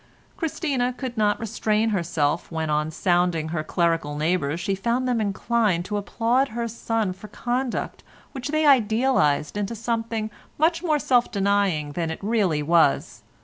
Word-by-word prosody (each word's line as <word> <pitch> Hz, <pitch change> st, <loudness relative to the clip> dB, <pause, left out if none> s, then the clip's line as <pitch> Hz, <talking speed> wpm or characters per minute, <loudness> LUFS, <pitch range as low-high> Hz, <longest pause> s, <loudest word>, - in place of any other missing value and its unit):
Christina 280 Hz, -6 st, -1 dB
could 255 Hz, -3 st, -5 dB
not 210 Hz, -2 st, +1 dB
restrain 220 Hz, 0 st, 0 dB
herself 170 Hz, -6 st, -1 dB
when 160 Hz, -1 st, -2 dB
on 150 Hz, +1 st, +1 dB
sounding 175 Hz, -1 st, +1 dB
her 160 Hz, -1 st, -2 dB
clerical 165 Hz, -3 st, 0 dB
neighbours 155 Hz, -1 st, 0 dB
she 195 Hz, +3 st, -1 dB
found 235 Hz, +6 st, 0 dB
them 245 Hz, -3 st, +1 dB
inclined 205 Hz, -3 st, 0 dB
to 210 Hz, +1 st, -2 dB
applaud 235 Hz, +6 st, +1 dB
her 235 Hz, 0 st, -3 dB
son 225 Hz, -3 st, -2 dB
for 195 Hz, +3 st, -12 dB
conduct 245 Hz, +4 st, -3 dB, 0.3 s
which 265 Hz, -2 st, -5 dB
they 310 Hz, +1 st, +1 dB
idealised 220 Hz, -, +3 dB
into 205 Hz, +3 st, -2 dB
something 225 Hz, -1 st, -2 dB, 0.3 s
much 330 Hz, +2 st, +2 dB
more 315 Hz, -4 st, +2 dB
self 250 Hz, -4 st, +2 dB
denying 195 Hz, -7 st, +1 dB
than 165 Hz, +1 st, -2 dB
it 160 Hz, -, -4 dB
really 195 Hz, -9 st, +1 dB
was. 160 Hz, -2 st, +2 dB
210 Hz, 150 wpm, -24 LUFS, 170-240 Hz, 0.3 s, idealised